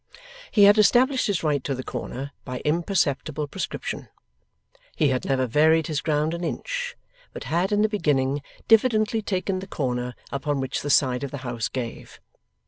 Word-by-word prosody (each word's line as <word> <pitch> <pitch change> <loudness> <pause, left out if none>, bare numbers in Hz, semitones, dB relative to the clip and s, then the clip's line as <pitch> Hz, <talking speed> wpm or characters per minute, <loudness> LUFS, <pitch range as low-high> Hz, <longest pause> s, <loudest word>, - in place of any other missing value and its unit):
He 205 - +4
had 205 +2 +7
established 255 +5 +4
his 200 -6 -1
right 145 -4 +1
to 135 - -2
the 130 - -5
corner, 130 +3 -5
by 125 -1 -6
imperceptible 155 -3 0
prescription. 185 +7 -5 0.9
He 150 -3 +3
had 130 -1 -1
never 130 -1 +1
varied 155 +5 +3
his 150 -2 -2
ground 155 +1 0
an 170 +1 -4
inch, - - -3 0.4
but - - -7
had 175 +5 0
in 205 0 +3
the - - +4
beginning 145 -9 0 0.3
diffidently 225 -1 +4
taken 190 -1 -2
the 190 - -8
corner 125 -6 -2 0.2
upon 140 +1 -1
which 130 -1 -2
the 145 - -4
side 130 -2 +3
of 140 - -3
the 140 - -6
house 120 -3 -2
gave. 120 -3 -6
150 Hz, 170 wpm, -25 LUFS, 135-200 Hz, 0.9 s, had